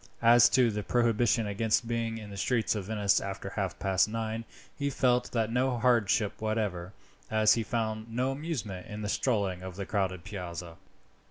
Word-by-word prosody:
As 120 +1 +7
to 125 -3 +4
the 105 0 -3
prohibition 115 0 +2
against 110 +3 0
being 115 -1 -2
in 105 -2 -9
the - - -7
streets 115 +2 +1
of 105 -4 -4
Venice 105 -1 +2
after 95 0 -5
half - - -3
past 95 +1 +2
nine, 115 0 -3 0.3
he 140 -1 -1
felt 125 -2 +1
that 115 -2 0
no 125 +1 +1
hardship 115 -4 +2
whatever, 105 -5 -2 0.4
as 110 -1 +4
he 115 - 0
found 110 0 -3
no 125 +3 0
amusement 135 - -5
in 105 0 -5
strolling 100 -5 0
in 95 0 -7
the 100 +2 -5
crowded 95 -4 -1
Piazza. 90 -4 -7
110 Hz, 170 wpm, -29 LUFS, 100-120 Hz, 0.4 s, As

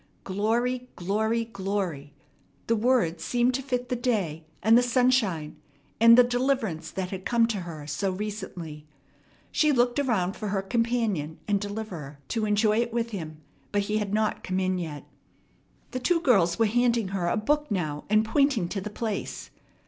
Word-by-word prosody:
"Glory," 235 +6 0
"glory," 220 +5 0
"glory!" 190 -9 -3 0.5
The 230 - +2
words 215 -8 +1
seemed 245 +1 +2
to 265 - -1
fit 250 -2 -3
the 250 - 0
day, 200 -11 -1 0.2
and 220 +2 +6
the 245 - +7
sunshine, 245 -10 +1 0.4
and 230 +1 +8
the 250 - +9
deliverance 245 - 0
that 185 +1 -4
had 190 -1 -5
come 235 +1 +3
to 220 - -1
her 165 -4 -7
so 150 +7 -1
recently. 185 -6 -6 0.6
She 305 -1 +3
looked 245 0 +2
around 210 -9 0
for 215 - -5
her 195 -1 -1
companion 225 -8 0
and 200 -1 +1
deliverer 200 -9 -6
to 225 -2 0
enjoy 210 +1 +3
it 235 0 0
with 235 0 -1
him, 155 -6 -6 0.3
but 205 -1 +1
he 210 +2 0
had 205 -2 -3
not 215 0 0
come 185 0 -1
in 185 -1 0
yet. 155 -4 -6 0.9
The 255 - -3
two 335 +7 +2
girls 190 - +3
were 225 - +4
handing 235 -1 +2
her 190 -3 -1
a 175 - +1
book 295 +7 0
now 155 -8 -2
and 215 +1 +4
pointing 235 -6 +2
to 195 - -3
the 210 - -5
place. 215 0 -4
210 Hz, 170 wpm, -27 LUFS, 185-240 Hz, 0.9 s, the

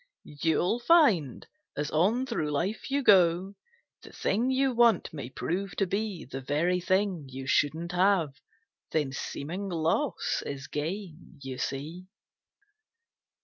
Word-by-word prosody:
You'll 160 +8 0
find 235 - +3 0.3
as 145 0 -2
on 210 +11 +2
through 220 - -2
life 175 - -2
you 280 +1 0
go 185 -2 +4 0.5
The - - -13
thing 230 +6 0
you 265 0 +2
want 235 -6 +3
may 140 -5 -6
prove 180 +5 -3
to 195 - +1
be 200 -2 -3
The 135 +1 -7
very 165 +7 0
thing 185 -4 0
you 130 +1 -7
shouldn't 160 +5 +1
have. 180 -5 +2 0.6
Then 150 -4 0
seeming 170 +8 -5
loss 170 - 0
is 135 -2 -6
gain, 170 +3 -6
you 130 -1 -6
see. 155 +8 -4
175 Hz, 130 wpm, -28 LUFS, 150-205 Hz, 0.6 s, go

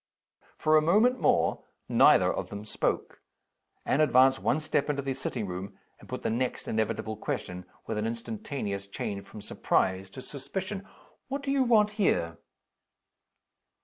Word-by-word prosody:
For 155 0 +3
a - - +5
moment 215 +10 +4
more - - +2 0.2
neither - - +5
of - - -4
them 100 +1 -7
spoke. - - -2 0.6
Anne 140 - +2
advanced 135 -2 +5
one 150 - +1
step 150 -2 0
into 140 -1 -1
the 135 0 -1
sitting 130 -4 -4
room, 95 +1 -6 0.2
and - - -16
put - - -5
the - - 0
next 125 +2 -2
inevitable 110 0 -1
question, 90 -3 -4 0.2
with 110 -1 -2
an 110 - -1
instantaneous 115 -3 -4
change 100 0 -4
from 105 +2 -10
surprise 95 -2 0
to 130 +6 -10
suspicion. 190 +8 -5 0.4
"What 275 +1 -4
do 275 - -1
you 275 -1 +2
want 220 -4 +4
here?" 85 - +1
130 Hz, 150 wpm, -29 LUFS, 100-155 Hz, 0.6 s, a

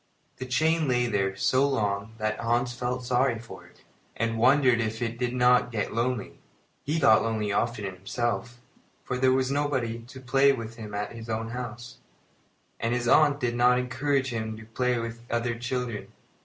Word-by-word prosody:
The 130 - -6
chain 155 +4 +2
lay 125 -1 +2
there 100 -4 0
so 130 +8 +2
long 105 -3 -1
that 110 0 -2
Hans 120 +1 0
felt 125 0 -3
sorry 125 0 +2
for 115 +1 -11
it, - - -23 0.3
and 115 0 -1
wondered 130 -1 +4
if 110 0 -2
it 120 -1 -3
did 125 0 -1
not 125 0 +4
get 110 -4 -2
lonely. 120 -2 -2 0.4
He 150 +3 -1
got 110 -8 +5
lonely 110 -2 -1
often 115 0 -1
himself, 115 +6 -3 0.4
for 125 - -3
there 130 0 +4
was 130 0 +1
nobody 135 -5 -1
to 120 +3 -12
play 135 +2 +4
with 115 -3 -6
him 105 -2 -7
at 105 0 -3
his 115 0 -9
own 115 0 -2
home, 120 -2 -5 1.0
and 115 +2 0
his 120 -1 -2
aunt 145 +2 +5
did 120 -3 0
not 125 +1 +4
encourage 130 +1 0
him 110 -1 -3
to 110 - -11
play 125 +2 0
with 115 0 -5
other 120 0 0
children. 120 -1 -4
120 Hz, 180 wpm, -27 LUFS, 115-130 Hz, 1.0 s, got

